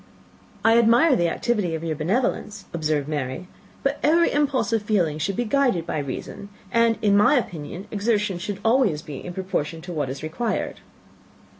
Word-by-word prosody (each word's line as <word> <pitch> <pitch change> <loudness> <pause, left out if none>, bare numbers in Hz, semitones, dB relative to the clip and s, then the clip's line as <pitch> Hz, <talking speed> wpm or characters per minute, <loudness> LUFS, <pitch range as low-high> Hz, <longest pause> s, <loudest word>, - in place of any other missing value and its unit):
"I 225 +1 +6
admire 240 +6 +5
the 175 -6 +2
activity 205 -4 -1
of 160 - -5
your 160 -2 -2
benevolence," 205 - -1
observed 155 -3 -1
Mary, 145 +2 -3 0.4
"but 275 +1 0
every 335 +3 +4
impulse 280 -5 +1
of 225 - +2
feeling 180 -8 0
should 190 +5 -1
be 245 - -1
guided 240 - +1
by 155 - -2
reason; 145 +8 -6 0.2
and, 230 0 +3
in 205 -1 +4
my 210 +8 +5
opinion, 175 - -3
exertion 205 -3 0
should 200 +2 -4
always 225 - +3
be 145 -3 -8
in 180 - -6
proportion 175 -4 -3
to 175 +1 -7
what 150 -5 -2
is 135 +3 -6
required." 170 +10 -2
195 Hz, 170 wpm, -24 LUFS, 160-230 Hz, 0.4 s, I